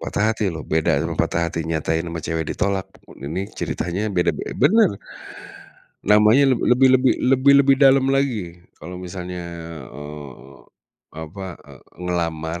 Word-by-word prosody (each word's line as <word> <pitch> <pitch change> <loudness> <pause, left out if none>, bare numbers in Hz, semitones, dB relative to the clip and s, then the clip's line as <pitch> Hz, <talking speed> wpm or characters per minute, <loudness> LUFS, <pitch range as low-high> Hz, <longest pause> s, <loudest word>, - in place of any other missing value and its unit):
Patah 100 - -2
hati, 110 - -3
loh. 80 -2 -6
Beda 80 0 +2
sama - - -3
patah 85 0 0
hati 85 - -4
nyatain 80 0 -1
ama 85 -1 -5
cewek 80 +1 -3
ditolak. 100 -2 -1 0.4
Ini 90 +6 -3 0.2
ceritanya 90 +4 -3
beda 90 -1 +2
be - - -5
benar. 215 +10 +5 1.1
Namanya 105 +6 +5
le 125 - +2 0.2
lebih 130 +2 +5
lebih 130 0 +4 0.2
lebih 135 +1 +5
lebih 135 0 +5
dalam 135 -1 +5
lagi. 110 -11 -1 0.2
Kalau 90 +2 -9
misalnya, 90 0 -6 0.5
eee, 70 -2 -11 0.6
apa, 90 +4 -8
eee, - - -14 0.2
ngelamar, 85 -1 -3
90 Hz, 145 wpm, -21 LUFS, 80-115 Hz, 1.1 s, benar